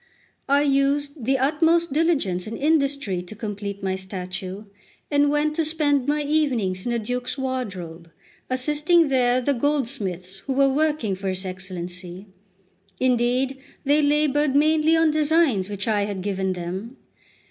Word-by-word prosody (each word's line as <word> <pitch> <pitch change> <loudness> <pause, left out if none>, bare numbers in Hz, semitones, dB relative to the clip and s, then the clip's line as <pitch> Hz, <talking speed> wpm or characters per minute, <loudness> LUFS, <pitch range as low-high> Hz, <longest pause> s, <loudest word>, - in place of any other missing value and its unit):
I 285 +1 +4
used 280 -1 0
the 270 +2 +2
utmost 320 +3 +2
diligence 280 - +1
and 225 - -5
industry 280 - +1
to 180 +4 -10
complete 205 -2 -5
my 190 -1 0
statue, 190 +1 -5 0.5
and 290 0 +3
went 300 +1 +1
to 325 - +2
spend 295 -4 +1
my 295 +1 +1
evenings 250 -11 0
in - - 0
the 235 - +1
Duke's 245 +4 -3
wardrobe, 190 -11 -5 0.4
assisting 300 +5 +2
there 250 -2 +3
the 280 +3 +1
goldsmiths 230 - -2
who 270 - 0
were 275 0 +3
working 300 -8 0
for 190 +1 -5
his 190 +1 -2
Excellency. 180 0 -6 0.7
Indeed, 255 +1 +1 0.3
they 290 +2 +3
laboured 295 -1 +2
mainly 310 +2 +4
on 325 -1 +4
designs 300 - +2
which 200 0 -3
I 210 -2 +1
had 200 -3 -5
given 190 -1 -1
them. 185 +8 -6
255 Hz, 145 wpm, -23 LUFS, 195-295 Hz, 0.7 s, I